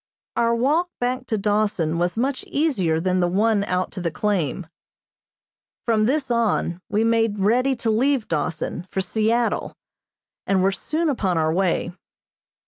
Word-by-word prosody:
Our 235 0 +2
walk 300 +9 +1
back 250 +1 -2
to 220 - 0
Dawson 205 -6 0
was 175 +3 0
much 260 +3 -1
easier 200 - +1
than 185 +2 0
the 175 - +2
one 205 +3 +2
out 180 -1 -1
to 185 - -6
the 170 - 0
claim. 185 -3 -1 1.2
From 220 -2 +2
this 270 -1 0
on, 220 -6 0
we 210 +1 +1
made 225 -2 +2
ready 245 +7 +2
to 235 -2 -1
leave 255 +2 +1
Dawson 165 +2 -3
for - - -3
Seattle, 225 +4 0 0.7
and 190 -2 +2
were 195 - +3
soon 315 +11 -2
upon 195 - 0
our 160 0 +1
way. 180 -1 0
215 Hz, 150 wpm, -23 LUFS, 185-240 Hz, 1.2 s, were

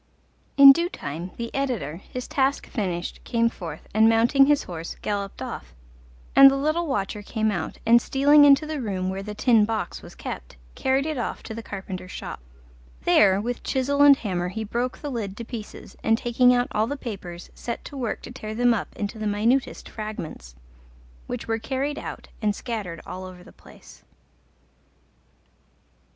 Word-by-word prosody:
In 275 -1 +12
due 340 +5 +1
time 160 - -6
the 235 0 -5
editor, 250 - -2
his 250 +6 -8
task 275 0 0
finished, 180 -6 -4
came 230 -1 +1
forth, 165 -8 -8
and 220 +1 +5
mounting 235 +5 +5
his 295 -1 +3
horse, 170 -2 -7
galloped 200 -1 -3
off; - - -7 0.6
and 275 0 +10
the 275 - 0
little 310 +4 0
watcher 210 -6 -2
came 220 +1 -1
out, 170 -5 -4
and 235 +1 +6
stealing 290 +2 +5
into 285 +1 +6
the 305 -2 -4
room 190 -4 -2
where 190 +1 -4
the 210 +1 -7
Tin 225 -1 +4
Box 215 -4 -2
was - - -13
kept, - - -7 0.2
carried 265 +1 +1
it 310 -4 -2
off 240 - -4
to - - -7
the 230 - -6
carpenter's 190 -3 -7
shop. - - -7 0.6
There 195 - +5
with 240 +4 -3
chisel 280 +2 0
and 285 -1 +8
hammer 180 -6 -2
he 220 +5 -4
broke 240 +4 -2
the 290 - -6
lid 210 -5 -4
to 235 - -6
pieces, 225 -3 -9
and 225 0 +3
taking 245 +1 +3
out 245 0 +2
all 215 +1 +1
the 285 +3 -3
papers, 185 -9 -7
set 235 - -6
to 285 - -9
work 245 -5 -3
to - - -8
tear 215 -4 -7
them 245 +1 +4
up 220 - -4
into 210 +1 -4
the 215 - -2
minutest 225 +6 0
fragments, 165 - -7 0.7
which - - -5
were 225 0 0
carried 275 +4 -2
out - - -7
and 210 -2 +1
scattered 205 -10 -5
all 185 - -7
over 185 -1 -10
the - - -15
place. - - -17
225 Hz, 180 wpm, -25 LUFS, 195-265 Hz, 0.7 s, In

